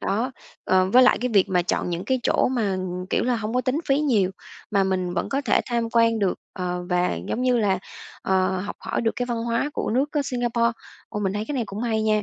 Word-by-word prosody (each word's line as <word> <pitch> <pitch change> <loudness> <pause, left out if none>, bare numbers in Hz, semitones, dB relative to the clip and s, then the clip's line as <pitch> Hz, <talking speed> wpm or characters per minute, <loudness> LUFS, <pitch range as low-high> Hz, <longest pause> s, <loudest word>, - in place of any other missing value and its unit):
đó. 230 +6 -1 0.3
Ờ, 185 0 +3
với 255 +3 +7
lại 255 - +5
cái 250 0 -1
việc 195 - +5
mà 180 -2 +2
chọn 180 - -1
những 175 +2 -3
cái 260 +2 0
chỗ - - +2
mà, 220 -7 0 0.3
kiểu - - +2
là, 245 -1 +1
hông 220 +2 -4
có 250 - +3
tính 255 +4 0
phí 275 +1 +4
nhiều 220 -11 +2 0.4
mà 200 -2 +3
mình 185 -2 -1
vẫn - - -1
có 275 +1 0
thể 225 - +3
tham 235 -2 -1
quan 230 -1 +4
được, 195 -3 +1 0.2
ờ, 180 -1 -3
và, 180 0 +2
giống 250 - -1
như 250 -1 +3
là, 195 -4 +2 0.4
ờ, 190 0 +1
học 205 - -5
hỏi - - -2
được 225 -1 +1
cái 245 - -1
văn 240 -1 -2
hóa 235 +5 0
của - - -2
nước, 270 +5 +1
á, 295 - +1
Singapore. 240 -2 0 0.4
Ồ, 210 - -4
mình 190 -1 0
thấy 210 +1 -2
cái 295 - -2
này 245 - 0
cũng 200 +2 -6
hay 220 -2 0
nha, 215 -1 +2
225 Hz, 250 wpm, -24 LUFS, 190-245 Hz, 0.4 s, với